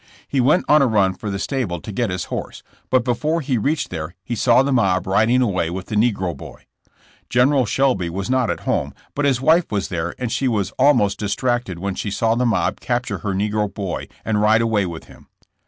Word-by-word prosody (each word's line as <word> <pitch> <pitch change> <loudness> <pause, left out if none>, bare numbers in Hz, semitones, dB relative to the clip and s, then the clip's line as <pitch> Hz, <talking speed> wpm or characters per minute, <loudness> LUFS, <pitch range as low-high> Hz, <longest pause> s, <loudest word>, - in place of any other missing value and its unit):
He 135 - +1
went 145 +8 +3
on 150 0 +5
a 135 - +4
run 100 -5 +2
for 105 +3 -6
the 100 - -2
stable 100 - -2
to 105 - -8
get 115 +2 -1
his 90 0 -3
horse, - - -5 0.3
but 130 -2 +3
before 150 +7 0
he 130 -6 -1
reached 145 +8 -1
there 85 +1 -5
he 120 - -4
saw 120 +3 +4
the 140 - -1
mob 95 -7 +2
riding 110 +6 +3
away 95 -7 0
with 95 +2 -5
the 110 - -5
negro 105 -6 +1
boy. - - -12 0.6
General 130 0 +3
Shelby 125 -7 +1
was 95 +3 -4
not 130 -2 +1
at - - -2
home, - - -1 0.2
but 145 - -1
his 130 -3 +2
wife 160 +4 +3
was 100 -3 -1
there 85 -1 -3
and 125 -3 -3
she 135 - 0
was 105 -6 0
almost 125 -8 +3
distracted 120 -1 -1
when 100 +2 -3
she 105 - -4
saw 115 +3 +1
the 125 +1 +1
mob 115 - 0
capture 120 -6 -2
her 100 +1 -3
negro 105 +1 -1
boy 100 -4 -4 0.2
and 105 -2 +1
ride 110 +2 +4
away 105 -4 +1
with 85 -2 -7
him. - - -17
110 Hz, 220 wpm, -21 LUFS, 95-125 Hz, 0.6 s, on